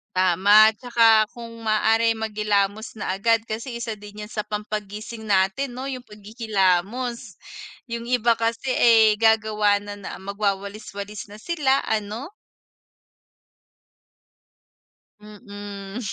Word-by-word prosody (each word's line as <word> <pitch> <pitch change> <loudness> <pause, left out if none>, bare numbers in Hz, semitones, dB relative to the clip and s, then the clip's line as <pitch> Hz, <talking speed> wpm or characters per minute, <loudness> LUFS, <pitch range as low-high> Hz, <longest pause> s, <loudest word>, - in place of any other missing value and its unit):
tama. 200 +4 +6
Tsaka 225 -3 +4
kung 230 -1 -9
maaaring 225 +1 +2
maghilamos 210 0 -1
na 205 - -3
agad 225 +4 +2
kasi 230 +3 -6
isa 225 -2 -5
din 210 +1 -10
'yan 210 - -10
sa 210 - -4
pampagising 210 +1 -6
natin 200 +7 +1
'no, 265 +2 -4
'yung 255 -1 -8
pagkikilamos, 215 +2 -1 0.6
'yung 235 0 -4
iba 240 -2 +2
kasi, 230 +3 -1
eh, 220 -4 +5
gagawa 215 -2 +3
na 205 0 -8
na 195 - -7
magwawalis 200 +1 -3
walis 205 +1 -7
na 205 - -12
sila, 275 +1 0
ano. 220 - -3 2.9
Mm. 205 -1 -9
215 Hz, 110 wpm, -23 LUFS, 205-230 Hz, 2.9 s, tama